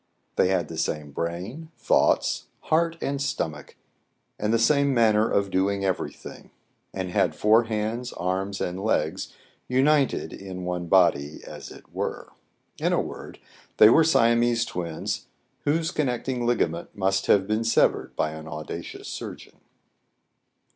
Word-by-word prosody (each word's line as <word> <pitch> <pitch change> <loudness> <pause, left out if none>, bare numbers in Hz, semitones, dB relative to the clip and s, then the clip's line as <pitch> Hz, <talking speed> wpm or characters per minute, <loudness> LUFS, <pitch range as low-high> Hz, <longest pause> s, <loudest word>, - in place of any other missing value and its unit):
They - - +3
had 90 -4 +1
the 80 0 -6
same 75 -3 -2
brain, 90 - -5
thoughts, - - +2
heart, 165 +1 +1
and 140 0 -2
stomach, 80 - -3 0.6
and 105 +1 0
the 115 - +4
same 140 +3 +3
manner 110 -2 +4
of 100 -1 +1
doing 100 +1 +1
every 95 -2 -1
thing; - - -12 0.4
and 95 -1 -4
had 95 -2 +1
four 110 +2 +4
hands, 110 +3 -2
arms, 95 +2 -2
and 90 +2 -3
legs, 110 - 0 0.4
united 135 +2 +2
in 95 -2 -7
one 90 -1 -3
body 80 -5 +3
as - - -9
it - - -15
were. - - -4 0.5
In - - +1
a - - +3
word, - - -6 0.4
they 105 - +9
were 160 - +6
Siamese 120 -5 +3
twins, 85 -3 -4 0.4
whose 160 +3 +1
connecting 125 -4 -1
ligament 85 -8 0
must 95 -1 0
have 95 -2 +4
been 110 +2 0
severed 115 - +2
by 75 - 0
an 80 0 -9
audacious 80 -1 -7
surgeon. - - -8
105 Hz, 140 wpm, -25 LUFS, 90-120 Hz, 0.6 s, they